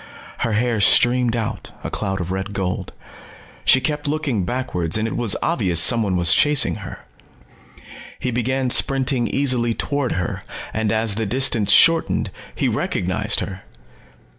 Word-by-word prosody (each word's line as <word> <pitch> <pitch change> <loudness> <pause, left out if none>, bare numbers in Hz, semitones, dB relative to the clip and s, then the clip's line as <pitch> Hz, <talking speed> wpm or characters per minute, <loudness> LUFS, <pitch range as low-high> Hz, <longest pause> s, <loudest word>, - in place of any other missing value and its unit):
Her 115 - -1
hair 115 0 0
streamed 120 +3 +4
out, 115 -2 -5
a - - -5
cloud 95 0 -3
of 90 0 -4
red 95 +1 -4
gold. 95 -1 -3 0.7
She 130 - +5
kept 150 +2 -3
looking 145 - -1
backwards 105 -9 -2
and 110 +1 -1
it - - -5
was 115 -5 +1
obvious 95 - +1
someone 105 0 +3
was 85 -1 +5
chasing 150 -1 +3
her. - - -10 1.1
He 125 - -3
began 125 +2 -1
sprinting 130 -3 +1
easily 125 -4 0
toward 140 -3 -2
her, 90 -3 -3 0.3
and 110 -2 -1
as 110 -1 +1
the 110 +1 -3
distance 115 -3 +2
shortened, 165 +9 +4 0.2
he - - 0
recognized - - -1
her. 95 -1 -6
115 Hz, 145 wpm, -20 LUFS, 100-130 Hz, 1.1 s, She